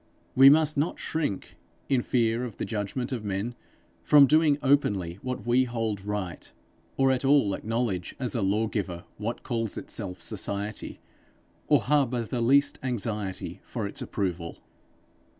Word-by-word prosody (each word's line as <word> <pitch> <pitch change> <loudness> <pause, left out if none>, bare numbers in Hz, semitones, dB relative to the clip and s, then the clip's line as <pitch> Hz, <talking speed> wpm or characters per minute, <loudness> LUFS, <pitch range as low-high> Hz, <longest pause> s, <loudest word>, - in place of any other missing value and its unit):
We 135 +1 +9
must 155 0 +4
not 150 +5 0
shrink, 150 -12 -3 0.3
in 130 -3 +2
fear 115 -1 +1
of 120 -5 -6
the - - -3
judgment 115 +5 -3
of 120 -4 -3
men, 100 +4 -2 0.5
from 145 -2 +7
doing 150 0 +4
openly 100 -11 +1
what 125 -4 -4
we 125 +2 +3
hold 115 -5 -3
right; 100 -4 -4 0.5
or 135 -1 +4
at 130 0 0
all 135 -7 +4
acknowledge 110 -4 -2
as 125 -6 -2
a 115 - -1
law 100 +3 +1
giver 95 -6 -3
what 110 +3 -4
calls 115 -3 -2
itself 95 -5 -5
Society, 100 +1 -4 0.7
or - - +4
harbour 130 -4 +1
the 120 +2 -3
least 140 +4 +3
anxiety 105 -6 -3
for - - -4
its - - -4
approval. 85 -4 -3
115 Hz, 150 wpm, -27 LUFS, 100-130 Hz, 0.7 s, We